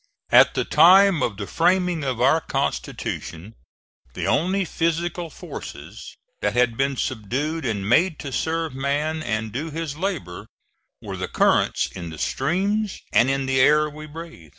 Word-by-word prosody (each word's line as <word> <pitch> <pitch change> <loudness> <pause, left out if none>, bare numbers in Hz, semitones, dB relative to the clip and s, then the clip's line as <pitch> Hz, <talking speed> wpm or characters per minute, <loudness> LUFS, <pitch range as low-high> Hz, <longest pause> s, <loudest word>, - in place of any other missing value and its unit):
At - - +6
the - - 0
time 190 -2 +6
of 115 -6 -1
the 100 - -4
framing 180 - +1
of 130 -4 -2
our 135 +6 +4
constitution 90 - -4 0.6
the - - -3
only 185 +6 +1
physical 170 +1 -2
forces - - -9 0.3
that 105 0 0
had 120 -2 +2
been 135 +1 0
subdued 140 +11 -2
and 100 -5 -2
made 160 - +3
to 140 - -6
serve 160 +1 -2
man 145 +4 -1
and 110 -5 -3
do 145 +8 -4
his 160 -2 -5
labor, 165 - -4 0.6
were - - -6
the - - -3
currents - - +2
in 85 -3 -8
the 80 - -9
streams 195 - -1
and 125 - +4
in 135 0 0
the 130 0 +1
air 150 +3 +5
we 155 +1 -10
breathe. 155 - -10
150 Hz, 155 wpm, -23 LUFS, 125-165 Hz, 0.6 s, At